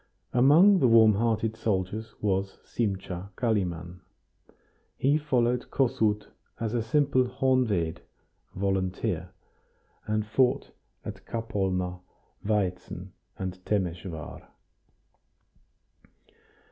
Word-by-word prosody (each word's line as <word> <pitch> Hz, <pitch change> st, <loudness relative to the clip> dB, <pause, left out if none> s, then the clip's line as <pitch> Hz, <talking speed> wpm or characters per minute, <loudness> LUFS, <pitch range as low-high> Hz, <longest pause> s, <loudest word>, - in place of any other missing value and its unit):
Among 160 Hz, +11 st, +6 dB
the 130 Hz, -, +4 dB
warm 110 Hz, -2 st, +7 dB
hearted 110 Hz, +1 st, 0 dB
soldiers 110 Hz, +1 st, -2 dB
was 95 Hz, -1 st, 0 dB
Simcha 95 Hz, -4 st, -3 dB
Kalimann. 90 Hz, -7 st, -1 dB, 1.0 s
He 145 Hz, +3 st, +3 dB
followed 125 Hz, -4 st, +1 dB
Kossuth 115 Hz, -6 st, +1 dB, 0.3 s
as 115 Hz, -1 st, -2 dB
a 120 Hz, -, +1 dB
simple 130 Hz, +2 st, +2 dB
honved 125 Hz, -10 st, +1 dB, 0.6 s
(volunteer), 95 Hz, -1 st, -1 dB, 0.8 s
and 110 Hz, 0 st, 0 dB
fought 125 Hz, +3 st, +1 dB, 0.3 s
at -, -, -7 dB
Kapolna, 95 Hz, -5 st, -2 dB, 0.4 s
Vaitzen, 95 Hz, -3 st, -2 dB, 0.3 s
and 95 Hz, -1 st, -5 dB
Temesvar. 90 Hz, -5 st, -3 dB
105 Hz, 85 wpm, -28 LUFS, 95-120 Hz, 1.0 s, warm